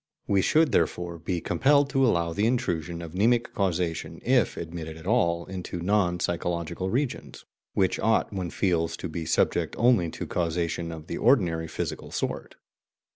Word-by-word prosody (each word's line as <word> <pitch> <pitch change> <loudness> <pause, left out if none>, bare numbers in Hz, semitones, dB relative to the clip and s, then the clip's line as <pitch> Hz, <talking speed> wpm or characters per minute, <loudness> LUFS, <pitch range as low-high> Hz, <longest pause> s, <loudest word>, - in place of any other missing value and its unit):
We 100 -1 +2
should, 155 - +3
therefore, 85 -1 0
be 85 +1 -2
compelled 140 - +3
to 135 0 +2
allow 85 -9 +2
the 105 +5 +1
intrusion 85 - -1
of 85 -1 -8
mnemic 115 +5 +2
causation, 90 -4 -1
if - - +2
admitted 80 -1 -6
at 80 - -12
all, 85 -6 +2
into 90 -2 -6
non 90 -1 +1
psychological 85 +1 -2
regions, 130 +5 -3 0.3
which 95 -2 +2
ought, 110 -1 +1
one 90 -3 -3
feels, 85 -3 0
to - - -5
be 80 0 -5
subject - - +1
only 115 -8 +4
to - - -6
causation 85 0 -2
of 80 -2 -8
the 85 - -5
ordinary 90 -10 +3
physical - - -4
sort. - - -4
90 Hz, 160 wpm, -27 LUFS, 85-105 Hz, 0.3 s, only